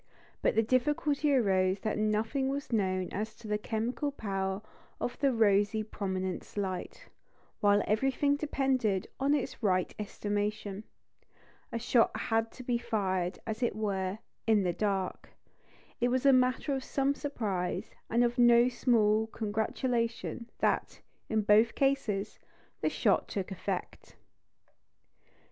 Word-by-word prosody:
But -, -, +2 dB
the 225 Hz, -, +4 dB
difficulty 290 Hz, +4 st, +1 dB
arose 190 Hz, -6 st, +2 dB
that 215 Hz, -, -1 dB
nothing 220 Hz, +6 st, 0 dB
was 280 Hz, 0 st, -4 dB
known 185 Hz, -4 st, 0 dB
as 215 Hz, +2 st, -4 dB
to 225 Hz, -1 st, -12 dB
the 210 Hz, 0 st, 0 dB
chemical 235 Hz, +7 st, -2 dB
power 195 Hz, -5 st, -3 dB, 0.4 s
of 245 Hz, -, -3 dB
the 275 Hz, -2 st, +3 dB
rosy 215 Hz, -1 st, +3 dB
prominence 190 Hz, -3 st, -4 dB
light, 190 Hz, -2 st, -4 dB, 0.5 s
while 205 Hz, 0 st, +4 dB
everything 270 Hz, +6 st, +2 dB
depended 265 Hz, -9 st, 0 dB
on 280 Hz, +2 st, +3 dB
its 280 Hz, -, -3 dB
right 185 Hz, -4 st, +1 dB
estimation. 205 Hz, 0 st, -3 dB, 0.9 s
A -, -, -2 dB
shot 235 Hz, 0 st, +2 dB
had 225 Hz, -1 st, 0 dB
to 255 Hz, -, -10 dB
be 240 Hz, -1 st, 0 dB
fired, 190 Hz, -6 st, -1 dB
as 220 Hz, +1 st, -4 dB
it 240 Hz, -4 st, +1 dB
were, 195 Hz, -2 st, -1 dB, 0.3 s
in 215 Hz, -3 st, +4 dB
the 175 Hz, -1 st, 0 dB
dark. 195 Hz, -1 st, -2 dB, 0.7 s
It 245 Hz, -, +2 dB
was 255 Hz, +2 st, 0 dB
a 275 Hz, -, +7 dB
matter 255 Hz, +3 st, +2 dB
of 265 Hz, -1 st, -2 dB
some 275 Hz, +1 st, +1 dB
surprise, 210 Hz, -12 st, -3 dB, 0.2 s
and 235 Hz, +2 st, +3 dB
of 240 Hz, +1 st, 0 dB
no 240 Hz, 0 st, +6 dB
small 220 Hz, -3 st, +2 dB
congratulation, 230 Hz, +2 st, -2 dB
that, -, -, 0 dB, 0.3 s
in 220 Hz, -1 st, +1 dB
both 215 Hz, +2 st, +4 dB
cases, 225 Hz, -7 st, 0 dB, 0.4 s
the -, -, +2 dB
shot -, -, +2 dB
took 195 Hz, -1 st, -4 dB
effect. 190 Hz, -, -5 dB
220 Hz, 135 wpm, -31 LUFS, 205-250 Hz, 0.9 s, a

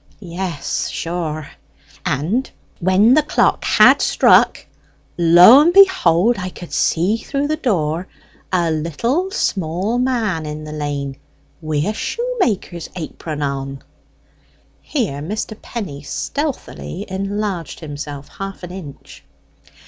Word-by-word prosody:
Yes, 175 Hz, -4 st, -3 dB
sure! 160 Hz, -3 st, -4 dB, 0.5 s
and 175 Hz, -, -1 dB, 0.3 s
when 190 Hz, +6 st, +4 dB
the 305 Hz, -, +5 dB
clock 300 Hz, -, +1 dB
had -, -, +6 dB
struck, -, -, +4 dB, 0.5 s
lo 175 Hz, +9 st, +8 dB
and 330 Hz, +3 st, +4 dB
behold, 245 Hz, -, +5 dB
I 185 Hz, -1 st, -3 dB
could 175 Hz, -1 st, -11 dB
see 185 Hz, +7 st, +1 dB
through 275 Hz, +4 st, -3 dB
the 310 Hz, -, 0 dB
door 180 Hz, -, -1 dB, 0.4 s
a 175 Hz, -3 st, +1 dB
little 230 Hz, -, -1 dB
small 190 Hz, -, -1 dB
man 220 Hz, -11 st, 0 dB
in 150 Hz, 0 st, -6 dB
the 155 Hz, -, -8 dB
lane 145 Hz, -2 st, -4 dB, 0.4 s
wi' 155 Hz, -2 st, -1 dB
a 210 Hz, -, 0 dB
shoemaker's 245 Hz, -, -2 dB
apron 155 Hz, -3 st, -5 dB
on." 135 Hz, -1 st, -4 dB, 1.0 s
Here 205 Hz, -, -2 dB
Mr. 215 Hz, +6 st, -4 dB
Penny 180 Hz, -12 st, -6 dB
stealthily 250 Hz, -, -4 dB
enlarged 195 Hz, -4 st, -3 dB
himself 145 Hz, -2 st, -7 dB
half 195 Hz, -1 st, -6 dB
an 180 Hz, -, -7 dB
inch. 160 Hz, -, -10 dB
180 Hz, 115 wpm, -19 LUFS, 155-225 Hz, 1.0 s, lo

